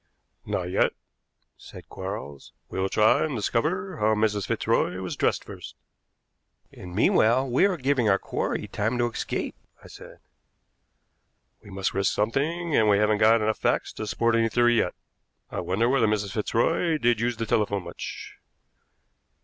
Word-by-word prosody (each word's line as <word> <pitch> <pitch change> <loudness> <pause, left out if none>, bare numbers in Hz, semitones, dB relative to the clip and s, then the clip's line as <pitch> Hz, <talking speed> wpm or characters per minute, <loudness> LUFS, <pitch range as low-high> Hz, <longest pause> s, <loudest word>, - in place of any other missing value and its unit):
"Not 90 - -1
yet," 95 - +2 0.6
said - - -13
Quarles. 70 -1 -7 0.2
"We - - -5
will 95 +1 0
try 110 +2 +3
and 155 -4 -2
discover 165 - -1
how 110 +1 +2
Mrs. 105 -1 0
Fitzroy 90 - 0
was 95 -1 -4
dressed - - 0
first." - - -10 1.0
"And 90 -1 -10
meanwhile 115 +5 +3
we 130 +9 +3
are 190 -3 -2
giving 135 -5 +1
our 95 - +4
quarry - - -3
time 110 +4 -2
to 120 0 0
escape," - - -3 0.3
I - - -12
said. - - -13 1.4
"We - - -15
must 95 0 -2
risk 100 0 +1
something, 150 +10 -1
and 110 -1 +4
we 100 - +5
haven't 105 0 +2
got 110 +1 +5
enough 110 0 0
facts - - 0
to 110 - -6
support 115 +2 +1
any 115 0 +2
theory 120 +1 +3
yet. 90 - -1 0.6
I - - -3
wonder 105 +6 0
whether 125 -3 +3
Mrs. 105 -2 -1
Fitzroy 115 - 0
did 120 -5 +2
use 120 -1 -1
the 115 - -2
telephone 100 -3 0
much?" - - -8
110 Hz, 160 wpm, -25 LUFS, 105-120 Hz, 1.4 s, we